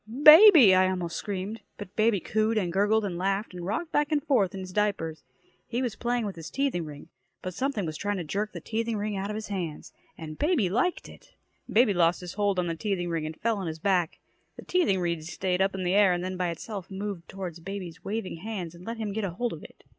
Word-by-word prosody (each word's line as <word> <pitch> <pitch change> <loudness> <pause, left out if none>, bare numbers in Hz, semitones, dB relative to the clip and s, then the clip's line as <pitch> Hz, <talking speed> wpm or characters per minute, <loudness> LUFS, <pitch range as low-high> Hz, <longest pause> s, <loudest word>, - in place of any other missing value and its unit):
"Baby!" 310 - +10
I 185 0 +5
almost 175 -2 -3
screamed. 205 +3 -4 0.2
But 205 -2 -9
baby 215 -2 +3
cooed 220 +4 0
and 180 -5 0
gurgled 205 +3 +2
and 175 -3 -4
laughed 195 +2 -1
and 180 -1 -7
rocked 225 - -3
back 295 +1 +1
and 295 -2 +1
forth 200 -10 +2
on 190 - -5
his 185 0 -8
diapers. 190 -7 -1 0.4
He 245 +2 -2
was 235 -4 -2
playing 240 -1 -1
with 200 - -4
his 165 -2 -8
teething 275 -11 -1
ring, 145 -1 -10 0.3
but 185 - -4
something 255 -3 -1
was 155 -1 -4
trying 205 +2 -2
to 180 - -3
jerk 205 +7 -2
the - - -8
teething 225 0 -2
ring 210 0 -2
out 195 +1 -3
of 210 - -3
his 215 0 -6
hands. 175 -6 -5 0.2
And 155 -2 -8
baby 295 - +2
liked 255 - 0
it. - - -16 0.4
Baby 225 -1 +4
lost 175 0 +2
his 180 -1 -7
hold 205 -2 0
on 180 - +1
the 170 - -1
teething 175 0 -2
ring, 165 -2 -2
and 155 - -8
fell 225 -2 0
on 190 - -4
his 160 0 -4
back. 175 -1 +1 0.4
The - - -11
teething 340 - +2
ring 170 -2 -1
stayed 180 +3 -2
up 195 0 +1
in 190 - -3
the 180 +1 +1
air 200 -2 +5
and 175 0 -2
then 185 0 -3
by 180 -1 -1
itself 185 +3 -6
moved 195 -3 -5
toward 175 -4 -7
baby's 185 -3 -7
waving 205 -4 -4
hands 185 -3 -5
and 175 +1 -13
let 230 0 -4
him 215 -3 -3
get 220 +1 -2
a 195 - -1
hold 235 +8 -2
of - - -9
it. - - -15
195 Hz, 245 wpm, -27 LUFS, 175-220 Hz, 0.4 s, Baby